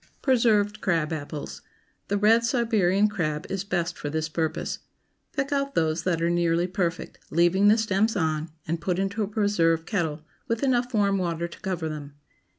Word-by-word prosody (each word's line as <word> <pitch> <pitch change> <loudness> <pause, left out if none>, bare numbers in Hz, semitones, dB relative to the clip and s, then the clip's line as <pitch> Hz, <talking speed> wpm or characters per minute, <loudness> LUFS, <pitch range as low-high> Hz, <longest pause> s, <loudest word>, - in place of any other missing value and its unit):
PRESERVED 220 -5 +3
CRAB 165 -4 0
APPLES. 145 -1 -6
✠ - - -30 0.4
The 205 - 0
red 220 +3 +4
Siberian 215 -5 +2
crab 155 -7 -2
is 195 0 -2
best 180 -3 -1
for 145 - -3
this 155 +1 -2
purpose. 160 0 -2 0.5
Pick 275 -1 -2
out 275 -1 -1
those 160 0 +1
that 170 -3 +1
are 170 - +2
nearly 170 0 +2
perfect, 180 -1 -3
leaving 175 +4 +3
the 215 +2 +6
stems 220 0 +1
on, 160 -3 -1 0.2
and 165 +1 -2
put 180 0 -1
into 195 +3 -1
a 205 - 0
preserve 185 -6 +1
kettle, 160 -7 -2 0.2
with 230 +2 -1
enough 250 -2 +1
warm 200 -2 +2
water 170 -1 -1
to 170 - -13
cover 180 -4 -3
them. 145 -2 -7
180 Hz, 175 wpm, -26 LUFS, 165-210 Hz, 0.5 s, the